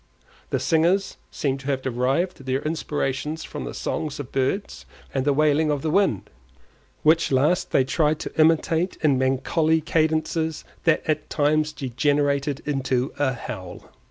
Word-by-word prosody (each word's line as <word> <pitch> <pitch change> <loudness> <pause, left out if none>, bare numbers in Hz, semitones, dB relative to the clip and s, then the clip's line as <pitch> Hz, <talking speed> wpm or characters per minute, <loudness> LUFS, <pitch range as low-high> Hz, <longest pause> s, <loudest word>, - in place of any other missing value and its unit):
The - - 0
singers 175 +4 +1
seemed 135 -2 -2
to 135 - -10
have 135 -2 -1
derived 135 +5 -1
their 130 +1 0
inspirations 150 -1 -2
from - - -6
the - - -6
songs 150 -2 -3
of 140 -3 -7
birds 135 +10 -2 0.3
and 135 -1 -1
the 145 - +3
wailing 150 +2 +3
of 145 -2 -1
the 155 - 0
wind, 185 - +1 0.7
which 160 +1 +4
last 145 +7 +2
they 135 - +3
tried 150 +3 +1
to - - -6
imitate 165 +2 +2
in 140 -4 +3
melancholy 135 +5 +2
cadences 160 0 0 0.2
that 165 -2 +3
at 155 - -1
times 155 +1 +1
degenerated 140 +1 0
into 135 -3 -1
a 140 -2 +2
howl. 95 -6 -8
150 Hz, 150 wpm, -24 LUFS, 135-160 Hz, 0.7 s, which